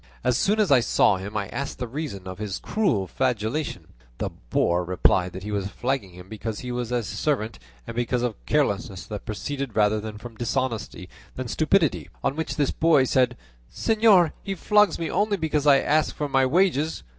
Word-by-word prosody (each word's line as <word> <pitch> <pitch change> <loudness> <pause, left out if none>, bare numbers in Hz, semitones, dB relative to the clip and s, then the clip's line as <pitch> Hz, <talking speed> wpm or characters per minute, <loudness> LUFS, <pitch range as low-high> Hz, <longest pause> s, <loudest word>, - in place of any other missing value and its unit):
As 125 -1 +2
soon 205 - +2
as 205 -8 +2
I 135 - +7
saw 105 -4 +3
him 100 +3 -5
I 100 -2 -2
asked 140 0 -4
the 125 - -4
reason 120 -8 -5
of 95 +1 -7
so 105 -3 -4
cruel 180 - +1
a - - -8
flagellation. 125 - -2 0.3
The - - -3 0.2
boor 85 +6 +2
replied 90 0 +2
that 95 +1 -7
he 105 - -5
was 100 -2 -1
flogging 125 0 -2
him 90 +1 -12
because 110 +1 -5
he 125 - -5
was 120 -1 -3
his 120 -2 -1
servant 115 -5 -2 0.3
and 115 - -7
because 120 +1 0
of 115 - -3
carelessness - - 0
that - - -7
proceeded 135 +5 -4
rather 105 0 +3
from 110 +2 -10
dishonesty 120 -6 -2 0.3
than 130 -1 -4
stupidity; 160 - +1
on 135 - 0
which 160 +1 -3
this 145 -3 +1
boy 160 -4 +4
said, 125 -1 +2 0.3
'Señor, 215 -7 +4
he 195 - -4
flogs 210 0 +3
me 165 - -3
only 205 0 +1
because 155 -3 0
I 140 -1 +8
ask 155 +2 +1
for 150 - -2
my 135 -1 +3
wages. 160 -1 +1
125 Hz, 190 wpm, -25 LUFS, 105-155 Hz, 0.3 s, I